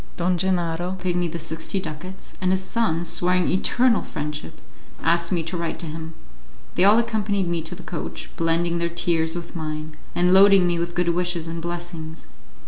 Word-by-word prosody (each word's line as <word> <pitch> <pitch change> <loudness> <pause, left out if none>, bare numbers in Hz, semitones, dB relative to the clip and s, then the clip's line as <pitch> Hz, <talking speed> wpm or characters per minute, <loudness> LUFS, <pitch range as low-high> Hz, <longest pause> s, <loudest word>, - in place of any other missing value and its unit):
Don 180 +1 +2
Gennaro 175 -1 0
paid 185 -1 -2
me 175 -1 +1
the 170 +1 -4
sixty 165 +4 -3
ducats, 185 +2 -7
and 185 - +2
his 190 0 +1
son, 185 -6 0
swearing 180 +1 +2
eternal 235 +6 +3
friendship, 150 +2 -5 0.4
asked 170 +1 +2
me 170 -3 +1
to 165 +3 -4
write 170 -1 -2
to - - -4
him. 160 +1 -6 0.6
They 180 - +2
all 205 +3 +7
accompanied 215 -5 +1
me 170 -1 0
to 165 +3 -4
the 180 - -11
coach, 170 - -5
blending 170 +1 +1
their 170 0 0
tears 165 -1 0
with 175 0 -6
mine, 155 -1 -4 0.2
and 180 +1 +4
loading 195 -1 +7
me 175 -1 +1
with 170 0 -3
good 175 -1 +2
wishes 175 -1 0
and 165 0 -4
blessings. 170 -2 -6
175 Hz, 185 wpm, -24 LUFS, 165-185 Hz, 0.6 s, all